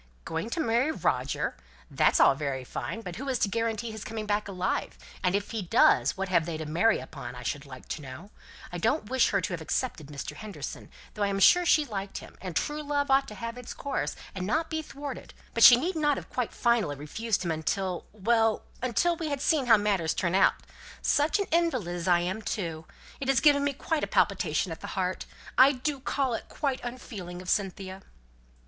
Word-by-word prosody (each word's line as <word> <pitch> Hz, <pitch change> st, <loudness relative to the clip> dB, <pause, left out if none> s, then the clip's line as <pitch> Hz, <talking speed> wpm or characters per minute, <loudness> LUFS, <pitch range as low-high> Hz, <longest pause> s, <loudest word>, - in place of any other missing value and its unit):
"Going 165 Hz, +7 st, -3 dB
to 285 Hz, -, -3 dB
marry 240 Hz, +1 st, +2 dB
Roger! -, -, -1 dB, 0.4 s
That's -, -, +3 dB
all -, -, +7 dB
very 135 Hz, -2 st, -3 dB
fine. 220 Hz, -, -5 dB
But 180 Hz, -4 st, -7 dB
who 275 Hz, +3 st, -4 dB
is 260 Hz, -, +1 dB
to -, -, +2 dB
guarantee 230 Hz, +1 st, -2 dB
his 220 Hz, -2 st, -7 dB
coming 220 Hz, -1 st, -5 dB
back 210 Hz, 0 st, 0 dB
alive? 185 Hz, -1 st, -2 dB, 0.3 s
And 180 Hz, 0 st, +2 dB
if 200 Hz, 0 st, -2 dB
he 225 Hz, -2 st, -2 dB
does, 140 Hz, -5 st, +4 dB
what 195 Hz, 0 st, -2 dB
have 175 Hz, -3 st, +2 dB
they 165 Hz, -2 st, -3 dB
to 155 Hz, -, -5 dB
marry 170 Hz, +9 st, +3 dB
upon, 120 Hz, +1 st, -8 dB
I 125 Hz, -, -8 dB
should 140 Hz, +4 st, -3 dB
like 130 Hz, -2 st, -11 dB
to 155 Hz, -, -4 dB
know? 145 Hz, +9 st, -10 dB, 0.4 s
I 175 Hz, -, -4 dB
don't 225 Hz, -, 0 dB
wish 260 Hz, -2 st, +4 dB
her 200 Hz, -, +2 dB
to 180 Hz, -, -3 dB
have 170 Hz, -, -4 dB
accepted 160 Hz, -, -2 dB
Mr. 145 Hz, -1 st, -6 dB
Henderson, 215 Hz, -2 st, -7 dB, 0.2 s
though 210 Hz, -, -7 dB
I 205 Hz, -, +3 dB
am 195 Hz, 0 st, -1 dB
sure 355 Hz, -, +6 dB
she 305 Hz, -2 st, +5 dB
liked 200 Hz, -5 st, -5 dB
him; -, -, -10 dB
and 185 Hz, -3 st, -6 dB
true 300 Hz, +1 st, -1 dB
love 285 Hz, -1 st, -1 dB
ought 270 Hz, 0 st, +4 dB
to 210 Hz, -, -8 dB
have 230 Hz, +2 st, -5 dB
its 250 Hz, -, -8 dB
course, 270 Hz, -, -2 dB, 0.2 s
and 185 Hz, -1 st, -4 dB
not 320 Hz, +8 st, 0 dB
be 315 Hz, 0 st, -1 dB
thwarted; 285 Hz, -3 st, -8 dB, 0.2 s
but 230 Hz, -, -1 dB
she 240 Hz, -, +11 dB
need 335 Hz, +9 st, -1 dB
not 295 Hz, -3 st, +2 dB
have -, -, -8 dB
quite 250 Hz, -3 st, -1 dB
finally 230 Hz, -11 st, +1 dB
refused 185 Hz, +8 st, -2 dB
him 170 Hz, -, 0 dB
until 180 Hz, +3 st, -2 dB
well, 225 Hz, +1 st, +2 dB, 0.2 s
until 255 Hz, +8 st, +2 dB
we 325 Hz, -2 st, -3 dB
had 285 Hz, -1 st, -2 dB
seen 285 Hz, -2 st, +2 dB
how 225 Hz, -2 st, +8 dB
matters 200 Hz, -6 st, +1 dB
turn 170 Hz, -1 st, 0 dB
out. 195 Hz, +1 st, +5 dB, 0.5 s
Such 295 Hz, +7 st, +3 dB
an 400 Hz, -, 0 dB
invalid 265 Hz, -, +1 dB
as 175 Hz, 0 st, -4 dB
I 175 Hz, -1 st, +5 dB
am 185 Hz, +5 st, -2 dB
too! 165 Hz, -7 st, -4 dB, 0.3 s
It 270 Hz, -, -4 dB
has 270 Hz, -2 st, +4 dB
given 285 Hz, 0 st, +5 dB
me 285 Hz, 0 st, +1 dB
quite 305 Hz, +3 st, -2 dB
a -, -, 0 dB
palpitation -, -, +1 dB
at -, -, -7 dB
the -, -, -6 dB
heart. -, -, -1 dB, 0.3 s
I 265 Hz, +2 st, +9 dB
do 275 Hz, +2 st, -2 dB
call 265 Hz, -1 st, -1 dB
it 225 Hz, -, -5 dB
quite 275 Hz, -3 st, -1 dB
unfeeling 210 Hz, -8 st, -7 dB
of 180 Hz, 0 st, -3 dB
Cynthia." 190 Hz, -1 st, -2 dB
215 Hz, 220 wpm, -28 LUFS, 180-270 Hz, 0.5 s, she